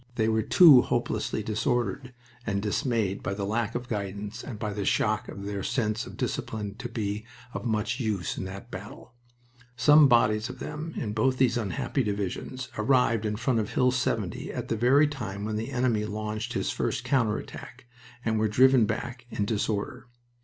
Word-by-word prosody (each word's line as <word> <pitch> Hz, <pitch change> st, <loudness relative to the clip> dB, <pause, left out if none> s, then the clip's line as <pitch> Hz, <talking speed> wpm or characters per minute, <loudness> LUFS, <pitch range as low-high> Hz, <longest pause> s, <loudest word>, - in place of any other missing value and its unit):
They 110 Hz, -2 st, +1 dB
were 110 Hz, 0 st, +2 dB
too 145 Hz, -, +8 dB
hopelessly 110 Hz, -, -1 dB
disordered 120 Hz, +2 st, -1 dB, 0.3 s
and 100 Hz, -4 st, -1 dB
dismayed 105 Hz, -2 st, -1 dB
by 100 Hz, -, -3 dB
the 100 Hz, -1 st, -3 dB
lack 110 Hz, +2 st, -1 dB
of 120 Hz, 0 st, -3 dB
guidance 105 Hz, -2 st, -4 dB
and 120 Hz, -6 st, -6 dB
by 105 Hz, -1 st, -3 dB
the 100 Hz, 0 st, -3 dB
shock 110 Hz, 0 st, +1 dB
to -, -, -8 dB
their 100 Hz, 0 st, -4 dB
sense 110 Hz, 0 st, -1 dB
of -, -, -10 dB
discipline 105 Hz, -2 st, -3 dB
to 120 Hz, -, -5 dB
be 105 Hz, -2 st, -3 dB, 0.3 s
of -, -, -5 dB
much 110 Hz, +1 st, -1 dB
use 105 Hz, -7 st, -1 dB
in -, -, -4 dB
that 95 Hz, +5 st, -8 dB
battle. 100 Hz, +5 st, -9 dB, 0.6 s
Some 145 Hz, +5 st, +7 dB
bodies 110 Hz, -2 st, +3 dB
of 130 Hz, -, -7 dB
them 150 Hz, +5 st, -6 dB
in 105 Hz, -4 st, -3 dB
both 130 Hz, +4 st, +1 dB
these 130 Hz, -2 st, +3 dB
unhappy 110 Hz, -, -1 dB
divisions 105 Hz, +4 st, -3 dB
arrived 115 Hz, -2 st, +2 dB
in 105 Hz, -, -1 dB
front 120 Hz, +2 st, +1 dB
of 105 Hz, -, -3 dB
Hill 125 Hz, 0 st, +3 dB
70 125 Hz, 0 st, -2 dB
at -, -, -5 dB
the -, -, +1 dB
very 130 Hz, +7 st, +5 dB
time 110 Hz, -8 st, -5 dB
when 110 Hz, 0 st, -2 dB
the 110 Hz, +4 st, -3 dB
enemy 125 Hz, -5 st, +1 dB
launched 110 Hz, +2 st, -4 dB
his -, -, -1 dB
first -, -, -2 dB
counter 115 Hz, -6 st, +2 dB
attack, -, -, -10 dB, 0.4 s
and 110 Hz, -1 st, +1 dB
were 110 Hz, -, +2 dB
driven 130 Hz, +2 st, +5 dB
back 120 Hz, +2 st, -4 dB
in 105 Hz, -, -1 dB
disorder... 110 Hz, +4 st, -2 dB
110 Hz, 180 wpm, -27 LUFS, 105-125 Hz, 0.6 s, too